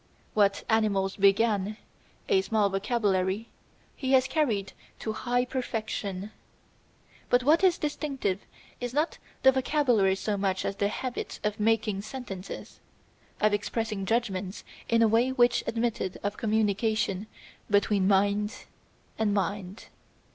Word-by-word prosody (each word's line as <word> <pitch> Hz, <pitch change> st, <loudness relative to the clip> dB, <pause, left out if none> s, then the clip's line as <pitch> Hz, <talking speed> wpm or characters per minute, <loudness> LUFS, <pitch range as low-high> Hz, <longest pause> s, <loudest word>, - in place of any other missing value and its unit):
What 200 Hz, -1 st, +2 dB
animals 200 Hz, -3 st, +1 dB
began 200 Hz, +1 st, +2 dB, 0.5 s
a 390 Hz, -4 st, +4 dB
small 215 Hz, -, +1 dB
vocabulary 195 Hz, 0 st, 0 dB, 0.5 s
he 265 Hz, -1 st, -1 dB
has 260 Hz, 0 st, +5 dB
carried 225 Hz, -12 st, 0 dB, 0.2 s
to 220 Hz, -, -4 dB
high 245 Hz, +2 st, 0 dB
perfection. 215 Hz, -6 st, -3 dB, 1.0 s
But 245 Hz, 0 st, +4 dB
what 310 Hz, +7 st, +4 dB
is 365 Hz, -2 st, +5 dB
distinctive 275 Hz, -, -2 dB, 0.4 s
is 245 Hz, +1 st, -4 dB
not 305 Hz, +3 st, 0 dB, 0.2 s
the 265 Hz, -, +8 dB
vocabulary 255 Hz, -7 st, +2 dB
so 205 Hz, +1 st, -2 dB
much 190 Hz, -1 st, -1 dB
as 195 Hz, -, -2 dB
the 200 Hz, -, +2 dB
habit 250 Hz, +4 st, -4 dB
of 210 Hz, 0 st, -1 dB
making 215 Hz, -2 st, +1 dB
sentences, 205 Hz, -4 st, -8 dB, 0.6 s
of 215 Hz, 0 st, +3 dB
expressing 210 Hz, -1 st, -2 dB
judgments 200 Hz, -4 st, -1 dB, 0.3 s
in 230 Hz, 0 st, +4 dB
a -, -, +6 dB
way 230 Hz, +4 st, +3 dB
which 245 Hz, -2 st, +3 dB
admitted 230 Hz, -5 st, -1 dB
of 205 Hz, +1 st, -1 dB
communication 215 Hz, -2 st, 0 dB, 0.4 s
between 205 Hz, -1 st, +3 dB
mind 205 Hz, +3 st, +1 dB, 0.5 s
and 210 Hz, -2 st, +2 dB
mind. 200 Hz, +1 st, -3 dB
215 Hz, 125 wpm, -28 LUFS, 200-245 Hz, 1.0 s, the